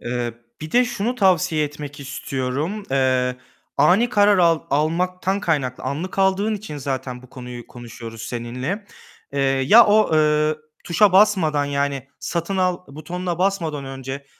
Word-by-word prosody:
Iıı, 120 -1 -3 0.3
bir 155 0 -7
de 245 +1 +5
şunu 240 0 -2
tavsiye 180 -7 +2
etmek 145 0 -8
istiyorum. 140 +7 -3
Eee, 130 -2 +1 0.4
ani 180 +12 +4
karar 205 -3 +4
al 165 -2 +4
almaktan 180 +6 0
kaynaklı 140 - -1
anlık 170 +7 -4
aldığın 195 +3 +2
için 205 -7 -7
zaten 130 -3 -4
bu 130 - -16
konuyu 125 -2 -9
konuşuyoruz 115 -2 -10
seninle. 125 - -4 0.5
Eee, 140 - -1
ya 135 - +6
o, 215 +1 +4
ııı, 150 0 +2 0.3
tuşa 185 +3 +3
basmadan 185 -8 +4
yani 140 -1 -2
satın 170 +3 -3
al 185 -1 +1
butonuna 175 +4 -5
basmadan 170 -7 -1
önce, 135 +1 -7
155 Hz, 140 wpm, -22 LUFS, 135-185 Hz, 0.5 s, ya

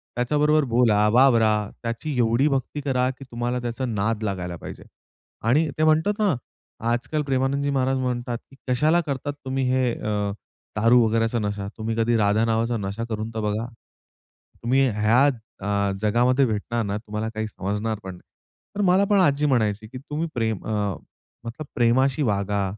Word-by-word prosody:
त्याच्याबरोबर 150 +5 +2
बोला, 110 -3 +4
वावरा 120 -4 +5 0.3
त्याची 120 +6 -3
एवढी 120 +4 +3
भक्ती 140 +1 -2
करा, 130 -2 +1
की 130 +1 -8
तुम्हाला 120 +1 -2
त्याचा 120 +2 -3
नाद 110 -1 -1
लागायला 90 -4 -3
पाहिजे. - - -9 0.6
आणि 140 +9 +3
ते 155 - +1
म्हणतात 155 +6 +3
ना 200 -7 +2 0.6
आजकाल 125 +6 -1
प्रेमानंदजी 140 +1 0
महाराज 135 -1 +1
म्हणतात 120 -1 -2
की - - -15
"कशाला 155 +7 +3
करतात 145 -2 -3
तुम्ही 135 0 -1
हे 130 -1 +2
अ, 105 -2 -2 0.5
दारू 115 +3 +5
वगैरेचा 115 +1 +1
नशा? 100 -1 -3
तुम्ही 110 0 -3
कधी 115 +1 +2
राधा 105 +1 +2
नावाचा 115 +1 0
नशा 100 +2 -4
करून 110 0 -3
तर - - -1
बघा. 105 +2 -1 1.0
तुम्ही 130 +3 +3
ह्या 110 +6 +4 0.3
अ, 100 0 0
जगामध्ये 125 +5 +3
भेटणार 115 +1 -2
ना 100 0 -2
तुम्हाला 105 0 -4
काही 110 0 -3
समजणार 105 +2 -3
पण 95 -1 -7
नाही." 90 - -16 0.5
तर 205 - -1
मला 190 +2 +4
पण 205 -1 +4
आजी 145 -4 +3
म्हणायची 110 -6 +1
की 130 - -9
तुम्ही 150 +5 -4
प्रेम 110 -4 -1
अ, 105 -3 -1 0.5
मतलब 115 +7 -6
"प्रेमाशी 130 +4 +2
वागा. 100 -3 0
120 Hz, 160 wpm, -24 LUFS, 110-135 Hz, 1.0 s, वावरा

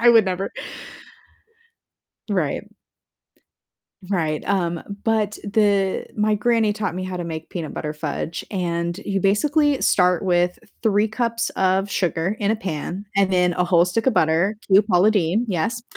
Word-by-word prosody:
I 240 - +5
would 225 -3 +6
never. 190 +1 -2 1.8
Right. 200 +3 -2 1.4
Right, 160 -6 -1
um, 175 -4 0 0.2
but 215 -2 +1
the 200 -2 +1
my 210 0 +2
granny 225 0 +2
taught 205 -4 -3
me 185 +1 -4
how 185 - -5
to 175 - -3
make 160 -1 -6
peanut 165 -4 -5
butter 150 0 -4
fudge, 150 +2 -4
and 170 -2 -2
you 195 -1 -1
basically 290 - +2
start 180 -1 +3
with 180 -1 +1 0.2
3 210 -1 +2
cups 230 +1 -1
of 190 +1 +1
sugar 180 0 -1
in 205 -1 +1
a - - +1
pan, 185 0 -5
and 195 -1 +3
then 180 -1 +3
a 180 +1 +1
whole 175 -1 +4
stick 220 +5 -1
of 260 - +3
butter; 170 +5 +2
true 195 +1 +6
Paula 195 -1 +3
Deen, 205 +2 +1
yes. 210 +5 -1
195 Hz, 155 wpm, -22 LUFS, 175-215 Hz, 1.8 s, would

